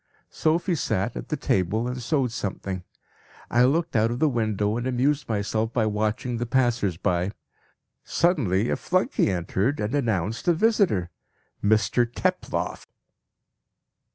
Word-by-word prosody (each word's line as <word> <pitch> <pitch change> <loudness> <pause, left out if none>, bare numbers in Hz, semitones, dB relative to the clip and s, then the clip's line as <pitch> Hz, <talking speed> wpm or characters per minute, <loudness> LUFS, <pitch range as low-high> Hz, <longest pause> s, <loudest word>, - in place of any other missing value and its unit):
"Sophie 170 +3 +1
sat 110 - -1
at - - -7
the 150 - -1
table 105 0 0
and 125 0 -4
sewed 135 -1 0
something. 95 -4 -4 0.7
I 120 +1 +5
looked 160 +3 +1
out 110 0 +3
of 120 - -2
the 155 - +3
window 110 -5 0
and 120 +2 -2
amused 135 +3 0
myself 110 +1 -1
by 115 -3 +2
watching 110 +3 -1
the 120 +1 -3
passers 120 -8 +1
by. 90 +3 0 0.7
Suddenly 120 - +1
a - - +2
flunkey 185 - +1
entered 95 - 0
and 105 +2 -2
announced 115 - -1
a 175 - +6
visitor 170 - +2 0.5
'Mr 110 +3 +2
Teploff.' - - -2
115 Hz, 135 wpm, -25 LUFS, 105-135 Hz, 0.7 s, a